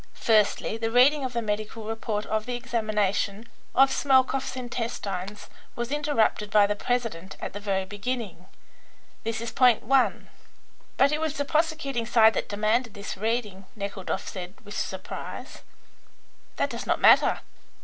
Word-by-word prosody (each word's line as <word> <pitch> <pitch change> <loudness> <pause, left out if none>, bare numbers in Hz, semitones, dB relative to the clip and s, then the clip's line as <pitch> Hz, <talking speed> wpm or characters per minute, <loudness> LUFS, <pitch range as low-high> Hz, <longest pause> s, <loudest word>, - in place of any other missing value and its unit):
Firstly, 215 0 +2
the 225 0 -1
reading 265 +5 +5
of 255 -1 -3
the 235 0 -1
medical 215 +1 -3
report 215 -1 -3
of 215 +1 -2
the 245 - -2
examination 215 -3 -1 0.3
of 270 0 +6
Smelkoff's 265 -1 +2
intestines 210 -5 -4 0.3
was 240 +2 -4
interrupted 285 -8 +1
by 205 0 +5
the 205 0 0
president 225 -7 -3
at - - -5
the 205 - -5
very 195 -2 -1
beginning. 205 -2 -5 0.8
This 225 0 -3
is 230 -1 -4
point 250 -4 +4
one." 260 +2 +2 0.7
"But 275 +1 +5
it 305 +1 -1
was 315 -2 -2
the 285 - -1
prosecuting 305 -6 0
side 220 -2 +6
that - - -3
demanded 215 +3 0
this 200 0 -6
reading," 210 -2 -2
Nekhludoff 200 -2 -4
said, 185 0 -7
with 205 - -9
surprise. 190 0 -6 0.9
"That - - -1
does - - -6
not - - +1
matter. - - +5
225 Hz, 150 wpm, -26 LUFS, 205-250 Hz, 0.9 s, of